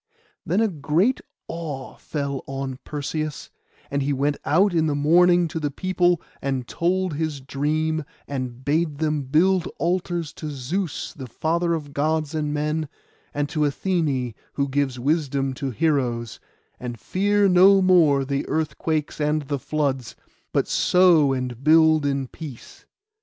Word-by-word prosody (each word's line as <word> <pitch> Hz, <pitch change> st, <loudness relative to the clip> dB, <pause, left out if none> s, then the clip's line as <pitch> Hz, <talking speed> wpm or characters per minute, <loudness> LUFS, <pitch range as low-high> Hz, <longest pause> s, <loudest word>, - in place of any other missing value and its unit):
Then 185 Hz, +7 st, +2 dB
a 225 Hz, -, +4 dB
great 170 Hz, -, +1 dB, 0.3 s
awe 150 Hz, -6 st, -6 dB
fell 140 Hz, -3 st, -4 dB
on 135 Hz, -1 st, -4 dB
Perseus; 150 Hz, 0 st, -4 dB, 0.4 s
and 140 Hz, 0 st, 0 dB
he 140 Hz, +1 st, 0 dB
went 140 Hz, +2 st, 0 dB
out 185 Hz, +5 st, +3 dB
in 160 Hz, -2 st, +2 dB
the 145 Hz, -, 0 dB
morning 175 Hz, +4 st, +4 dB
to 160 Hz, -, -4 dB
the 150 Hz, -2 st, -1 dB
people, 180 Hz, +2 st, +1 dB, 0.2 s
and 130 Hz, -2 st, -2 dB
told 185 Hz, 0 st, 0 dB
his 155 Hz, -1 st, -2 dB
dream, 155 Hz, +4 st, -1 dB, 0.2 s
and 130 Hz, -2 st, -5 dB
bade 150 Hz, 0 st, +1 dB
them 155 Hz, -1 st, 0 dB
build 165 Hz, +7 st, +2 dB
altars 175 Hz, -2 st, -1 dB
to 155 Hz, -, -4 dB
Zeus, 150 Hz, +6 st, -3 dB
the 130 Hz, -3 st, -8 dB
Father 170 Hz, +7 st, 0 dB
of 145 Hz, -3 st, -7 dB
Gods 155 Hz, +1 st, 0 dB
and 150 Hz, -2 st, -1 dB
men, 150 Hz, +1 st, -1 dB, 0.4 s
and 145 Hz, 0 st, -1 dB
to 165 Hz, -, -3 dB
Athené, 145 Hz, -, 0 dB, 0.2 s
who 140 Hz, -1 st, 0 dB
gives 135 Hz, -2 st, -1 dB
wisdom 140 Hz, -1 st, 0 dB
to 135 Hz, +1 st, -4 dB
heroes; 125 Hz, -5 st, -1 dB, 0.4 s
and 120 Hz, -2 st, -6 dB
fear 205 Hz, +1 st, +2 dB
no 190 Hz, +2 st, +6 dB
more 165 Hz, -7 st, +4 dB
the 140 Hz, +1 st, -2 dB
earthquakes 155 Hz, -1 st, -1 dB
and 150 Hz, 0 st, +1 dB
the 140 Hz, 0 st, -3 dB
floods, 135 Hz, -4 st, -2 dB, 0.4 s
but -, -, +1 dB
sow 175 Hz, -6 st, +4 dB
and 125 Hz, -1 st, -3 dB
build 155 Hz, -1 st, +5 dB
in 140 Hz, -1 st, -1 dB
peace. 145 Hz, -4 st, -11 dB
150 Hz, 145 wpm, -23 LUFS, 140-165 Hz, 0.4 s, no